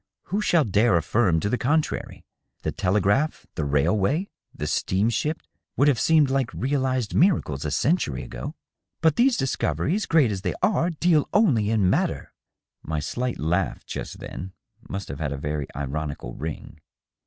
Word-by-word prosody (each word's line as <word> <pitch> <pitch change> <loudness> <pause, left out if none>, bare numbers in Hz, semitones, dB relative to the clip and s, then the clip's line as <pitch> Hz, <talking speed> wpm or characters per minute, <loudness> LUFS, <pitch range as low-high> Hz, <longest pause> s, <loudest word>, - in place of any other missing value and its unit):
Who 205 - +2
shall 170 -6 +3
dare 105 -2 +3
affirm 85 +1 +2
to - - 0
the 125 +4 0
contrary? 150 +4 -1 0.4
The - - -1
telegraph, 105 - +1
the 80 - -3
railway, 95 - +1 0.2
the - - -5
steamship, 115 +11 0 0.3
would 140 - +4
have 140 -5 +3
seemed 155 -4 +4
like 135 -3 0
realized 130 -4 0
miracles 145 - +2
a - - 0
century 150 - 0
ago." 145 +4 -7 0.2
" - - -59
But 160 -2 +4
these 250 +1 +3
discoveries, 155 - 0
great 150 -9 +4
as 95 -2 -3
they - - -2
are, 180 -4 +2
deal 165 -2 +2
only 135 - +3
in 110 -4 +2
matter." - - 0 0.5
My 80 -1 -3
slight 125 - -3
laugh, 85 +5 -1
just - - -6
then, 95 +1 -7 0.4
must 100 -1 -4
have 70 - -7
had 75 -3 -2
a - - -5
very 75 0 -3
ironical 70 -2 -4
ring. 80 0 -7
115 Hz, 160 wpm, -25 LUFS, -, 0.5 s, would